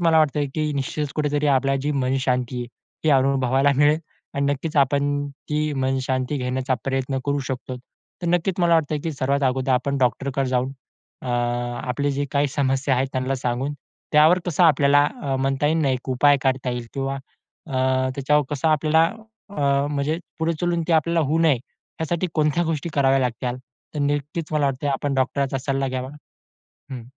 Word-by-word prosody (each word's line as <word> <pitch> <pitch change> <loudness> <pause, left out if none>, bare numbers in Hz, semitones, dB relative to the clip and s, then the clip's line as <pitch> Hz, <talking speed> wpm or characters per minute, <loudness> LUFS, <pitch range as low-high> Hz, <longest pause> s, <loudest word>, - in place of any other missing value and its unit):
मला 165 -2 +4
वाटतं 150 -1 +2
की 155 -1 -1
निश्चितच 140 +1 -3
कुठेतरी 150 -1 0
आपला 135 0 +2
जी 150 - 0
मनशांती 130 -2 0
आहे, 120 - -4 0.4
हे - - +6
अनुभवायला 135 +1 +2
मिळेल 145 +2 +4 0.4
आणि 140 - 0
नक्कीच 150 +3 -4
आपण 145 +1 +2 0.2
ती 150 0 0
मनशांती 130 +1 -1
घेण्याचा 130 +1 -1
प्रयत्न 135 0 -1
करू 145 0 0
शकतो. 130 0 -4 0.5
तर - - -2
नक्कीच 175 +2 +1
मला 170 -1 +4
वाटतं, 155 -1 +1
की 165 - -1
सर्वात 140 +1 0
अगोदर 130 +1 0
आपण 140 +2 0
डॉक्टरकडे 135 +2 0
जाऊन, 130 +1 0 0.5
अ, - - -8 0.6
आपले 140 +3 0
जे 140 +1 -1
काही 140 0 +2
समस्या 135 0 +1
आहेत, 130 +1 0
त्यांना 130 +1 -1
सांगून, 125 +3 -2 0.4
त्यावर 155 +4 +6
कसं 175 +1 +3
आपल्याला 145 -2 +5 0.2
अ, 135 -1 -1
म्हणता 135 +2 0
येईल 160 +2 +2
नाही, 135 -2 +2
एक 130 +1 -7
उपाय 145 +3 +4
काढता 130 -1 0
येईल 120 -1 -4
किंवा 135 0 -2 0.5
अ, 130 -2 +1
त्याच्यावर 145 +2 +2
कसं 145 +2 0
आपल्याला, 155 +1 +3 0.5
अ, 140 -5 +1
म्हणजे 145 +2 -1 0.2
पुढे 165 +1 +1
चालून 175 -1 0
ते - - +2
आपल्याला 165 +1 +2
होऊ 160 +2 +2
नये, 160 -3 +5 0.5
यासाठी 170 +3 -1
कोणत्या 155 +2 +2
गोष्टी 160 0 -2
कराव्या 135 -1 +3
लागतील 125 -1 -2 0.4
तर 150 - -3
नक्कीच 145 +3 -1
मला 150 -2 +2
वाटतं 135 +1 -2
आपण 140 +1 -1
डॉक्टरचा 135 +1 0
सल्ला 135 0 -1
घ्यावा. 130 +1 -4 0.8
हं. 130 -3 -6
140 Hz, 170 wpm, -23 LUFS, 130-150 Hz, 0.8 s, हे